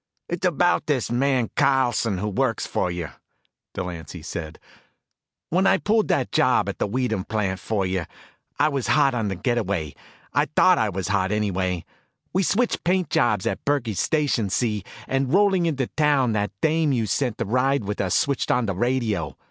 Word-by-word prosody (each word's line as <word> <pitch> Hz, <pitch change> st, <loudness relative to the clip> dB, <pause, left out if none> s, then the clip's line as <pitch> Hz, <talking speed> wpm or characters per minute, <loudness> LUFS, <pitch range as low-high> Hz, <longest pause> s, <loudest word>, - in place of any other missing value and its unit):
"It's 175 Hz, +2 st, -1 dB
about 175 Hz, -1 st, +1 dB
this 135 Hz, -6 st, 0 dB
man 125 Hz, -1 st, +1 dB
Carlson 125 Hz, -7 st, +2 dB
who 105 Hz, +4 st, -2 dB
works 115 Hz, +2 st, 0 dB
for 90 Hz, -, -1 dB
you," 85 Hz, -2 st, -4 dB, 0.7 s
Delancy 85 Hz, -2 st, -6 dB
said. 80 Hz, -1 st, -6 dB, 0.9 s
"When 185 Hz, +4 st, +3 dB
I 190 Hz, 0 st, +5 dB
pulled 215 Hz, +2 st, +1 dB
that -, -, 0 dB
job -, -, +3 dB
at -, -, -4 dB
the -, -, 0 dB
Weedham 110 Hz, -3 st, -1 dB
plant 100 Hz, -3 st, -2 dB
for 105 Hz, -3 st, -1 dB
you, 95 Hz, -2 st, -1 dB, 0.5 s
I 155 Hz, -, +3 dB
was 140 Hz, -4 st, -2 dB
hot 140 Hz, -3 st, +3 dB
on 115 Hz, -3 st, -1 dB
the 95 Hz, -, -2 dB
get 120 Hz, +6 st, 0 dB
away. 90 Hz, -9 st, -2 dB, 0.4 s
I -, -, +2 dB
thought 185 Hz, -1 st, +5 dB
I 110 Hz, -, +1 dB
was 95 Hz, -1 st, -4 dB
hot, 95 Hz, -1 st, +1 dB
anyway. 95 Hz, -4 st, -1 dB, 0.5 s
We 190 Hz, -, +2 dB
switched 230 Hz, +6 st, 0 dB
paint 180 Hz, 0 st, +1 dB
jobs 105 Hz, -5 st, +2 dB
at 95 Hz, -, -2 dB
Burkey's 120 Hz, -, 0 dB
station, 145 Hz, -9 st, +1 dB
see, 105 Hz, 0 st, -1 dB, 0.2 s
and 135 Hz, -1 st, 0 dB
rolling 190 Hz, -2 st, +3 dB
into 140 Hz, -5 st, 0 dB
town 145 Hz, -4 st, +2 dB
that 105 Hz, -1 st, 0 dB
dame 160 Hz, -1 st, +2 dB
you 120 Hz, -4 st, +1 dB
sent 120 Hz, +2 st, -1 dB
to -, -, -2 dB
ride 125 Hz, +2 st, +1 dB
with 105 Hz, +1 st, -2 dB
us 95 Hz, -2 st, 0 dB
switched 140 Hz, -2 st, 0 dB
on 125 Hz, -1 st, +2 dB
the 100 Hz, -, -1 dB
radio. 110 Hz, -, -1 dB
120 Hz, 180 wpm, -24 LUFS, 100-145 Hz, 0.9 s, I